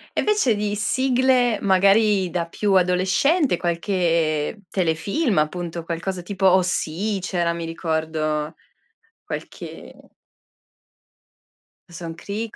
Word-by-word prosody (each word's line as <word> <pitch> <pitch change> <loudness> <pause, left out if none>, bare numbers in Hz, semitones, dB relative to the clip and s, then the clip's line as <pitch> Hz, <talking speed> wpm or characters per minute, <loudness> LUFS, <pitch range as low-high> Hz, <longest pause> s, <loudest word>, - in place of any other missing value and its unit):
E - - +1
invece 410 - +2
di 205 0 -1
sigle 250 +1 +2
magari 195 0 +3
da 170 -1 -2
più 200 +4 -1
adolescente, 190 - +2
qualche 170 0 0
telefilm 190 - 0
appunto, 170 +2 -1
qualcosa 180 +2 -3
tipo 190 +1 0
OC, 185 +2 +1
c'era 175 -2 -1
mi 170 0 -5
ricordo 160 -2 -2 0.7
qualche - - -8 2.0
Dawson's 165 -1 -7
creek, 215 +4 -5
185 Hz, 95 wpm, -22 LUFS, 170-210 Hz, 2.0 s, magari